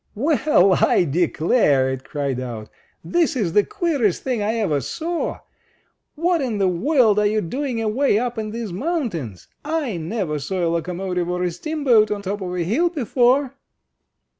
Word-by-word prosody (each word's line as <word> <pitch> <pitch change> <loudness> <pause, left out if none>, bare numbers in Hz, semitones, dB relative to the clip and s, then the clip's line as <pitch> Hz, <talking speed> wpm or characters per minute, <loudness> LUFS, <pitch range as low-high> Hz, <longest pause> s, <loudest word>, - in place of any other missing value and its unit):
"Well, 260 - +3
I - - +4
declarer 155 - +2
it 130 0 -5
cried 140 -2 -3
out, 115 -4 -6 0.3
"this 335 -3 +1
is 195 -10 -1
the 205 - +5
queerest 285 - -1
thing 250 -5 -1
I 215 +2 0
ever 175 -11 0
saw! 330 - -3 0.7
What 335 +1 +1
in 240 -6 -2
the 195 -1 +2
world 215 - +3
are 210 - +3
you 215 +1 +1
doing 250 - -3
away 225 +1 +1
up 240 0 -2
in 215 -1 -3
these 220 -3 -5
mountains? 200 - -3 0.2
I 295 - -2
never 165 -2 -3
saw 175 +5 -2
a - - +1
locomotive 180 +1 -2
or 180 0 -1
a 180 - 0
steamboat 250 - +2
on 205 -1 -3
top 200 +1 -3
of 180 -1 -4
a 175 - -1
hill 265 - +1
before!" 260 - +1
210 Hz, 165 wpm, -21 LUFS, 175-270 Hz, 0.7 s, the